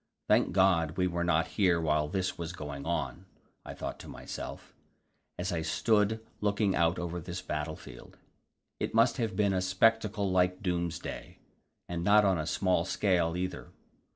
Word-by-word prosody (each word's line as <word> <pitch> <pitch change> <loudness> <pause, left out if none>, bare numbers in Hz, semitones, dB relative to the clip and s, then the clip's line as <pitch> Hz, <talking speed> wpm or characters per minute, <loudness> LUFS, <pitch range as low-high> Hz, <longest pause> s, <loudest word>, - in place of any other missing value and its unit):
Thank - - +3
God 90 -5 +3
we 90 - +2
were 85 -1 -1
not 85 -1 +2
here 90 -4 +4
while 75 -2 +1
this 95 +4 -2
was 85 0 -5
going 75 -3 -6
on, 85 +2 -3 0.4
I - - -8
thought - - -5
to - - -10
myself, - - -8 0.6
as 90 +1 -2
I 85 -2 -1
stood 110 +6 +1
looking 100 -1 +1
out 85 +1 +2
over 85 0 -4
this 90 +2 -6
battlefield; 75 -5 -6 0.6
it - - -3
must 115 +3 +4
have 115 -6 -1
been 100 -1 +2
a 95 - +1
spectacle 100 +1 +2
like 90 +1 +2
doomsday, 85 -2 -3 0.5
and 85 -1 -3
not 105 +2 +5
on 95 -4 +2
a 75 - -3
small 90 +1 +1
scale 90 -3 +1
either. 90 +1 -4
90 Hz, 160 wpm, -30 LUFS, 85-100 Hz, 0.6 s, not